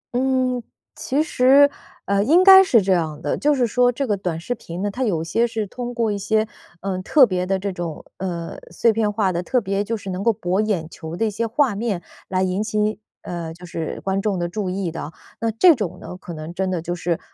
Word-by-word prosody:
嗯， 255 -1 +1 0.3
其 285 +4 0
实， 280 -1 +5 0.3
呃， 200 0 +2
应 330 - +5
该 385 0 +10
是 235 - +4
这 190 0 +3
样 155 -4 -1
的， 170 - -1
就 295 0 +2
是 255 -3 +2
说 245 +2 +3
这 275 +3 -2
个 210 -5 +1
短 180 -4 -3
视 210 +9 -3
频 180 -6 -7
呢， 205 - -1
它 255 +6 -3
有 175 -9 0
些 230 +8 +1
是 225 -2 -3
通 245 +4 -6
过 230 -2 +1
一 205 - -2
些， 220 +2 +1 0.3
嗯， 190 -1 -3
特 270 +8 +6
别 185 -4 -2
的 195 0 +1
这 195 +1 -3
种， 175 -4 -6
呃， 170 -3 -5
碎 220 +7 +2
片 215 -1 +1
化 205 -3 +1
的， 175 - -2
特 250 +8 +1
别 200 -2 -1
就 225 +2 -2
是 195 -2 -7
能 185 +1 -4
够 230 - +4
博 185 -1 -1
眼 195 -7 -1
球 160 -1 -8
的 225 - +1
一 215 - 0
些 230 +3 -2
画 245 +1 +2
面 200 -3 -2 0.2
来 185 0 0
引 185 +2 0
起 215 0 -3
你 210 +1 0 0.2
呃， 170 -2 -5
就 180 +1 -12
是 165 -2 -5
观 195 0 -1
众 200 -2 0
的 175 - -1
注 185 +2 -3
意 185 -2 -2
的。 160 -2 -6 0.3
那 230 - +1
这 325 - +6
种 195 - -4
呢， - - -8
可 180 -1 -10
能 155 +2 -7
真 190 +1 -1
的 180 -2 -1
就 175 +1 -3
是， 170 -1 -2
200 Hz, 260 characters per minute, -22 LUFS, 180-235 Hz, 0.3 s, 该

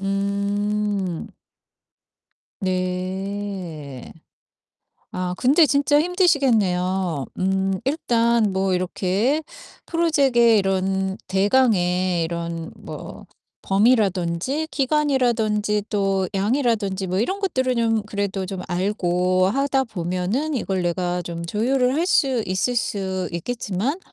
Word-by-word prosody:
음. 200 -1 -1 1.3
네. 185 -5 -4 1.0
아 180 0 -3
근데 290 +6 +5
진짜 290 +1 +3
힘드시겠네요. 200 - +1
음 190 +1 0
일단 235 - +1
뭐 190 0 +1
이렇게 190 - 0 0.5
프로젝트의 275 -9 +3
이런 190 0 0
대강의 185 -4 +2
이런 170 0 -4
뭐 - - -9 0.4
범위라든지 200 - +1
기간이라든지 240 -8 +1
또 195 -2 0
양이라든지 205 -3 0
뭐 185 +1 -1
이런 375 - -1
것들을 260 -10 0
좀 225 -2 +1
그래도 200 -2 -3
좀 190 -1 -5
알고 185 -1 +1
하다 270 +3 +1
보면은 195 - -2
이걸 190 -6 -1
내가 175 0 -1
좀 170 -1 -6
조율을 250 +7 +1
할 330 - +1
수 265 -9 +2
있을 190 +7 0
수 190 -5 -2
있겠지만 230 - -2
200 Hz, 210 characters per minute, -22 LUFS, 185-245 Hz, 1.3 s, 근데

